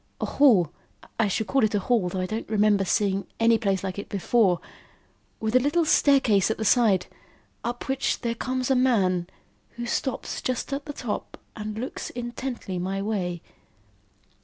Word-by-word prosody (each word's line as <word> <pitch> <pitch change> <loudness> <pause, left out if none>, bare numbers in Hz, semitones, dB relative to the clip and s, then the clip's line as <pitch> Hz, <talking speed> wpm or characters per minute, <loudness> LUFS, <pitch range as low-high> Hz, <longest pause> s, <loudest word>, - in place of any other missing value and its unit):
A - - -1
hall 215 - +4 0.5
(I 225 - +3
should 210 +3 -1
call 270 +2 +1
it 215 0 +2
a - - +3
hall, 205 -3 +1
though 185 +1 -3
I - - -1
don't 215 +4 -4
remember 210 -2 +3
seeing 195 +1 0
any 230 0 +4
place 195 -3 0
like 190 0 -4
it - - -7
before), 200 -2 +2 0.8
with 220 +2 -1
a - - +8
little 295 +6 +1
staircase 265 -11 +4
at 220 - -1
the 220 - -3
side, 205 -6 +4 0.6
up 240 +1 -4
which 270 0 0
there 235 -2 -1
comes 255 +2 -2
a - - +4
man, 195 -9 +2 0.5
who 240 0 -5
stops 260 +2 -3
just 255 +2 -2
at 280 +1 -3
the 290 - -6
top 245 -6 -5 0.2
and 215 -1 -5
looks 250 +4 -5
intently 240 -5 -5
my 190 +2 -2
way. 190 -5 -2
220 Hz, 175 wpm, -25 LUFS, 195-250 Hz, 0.8 s, a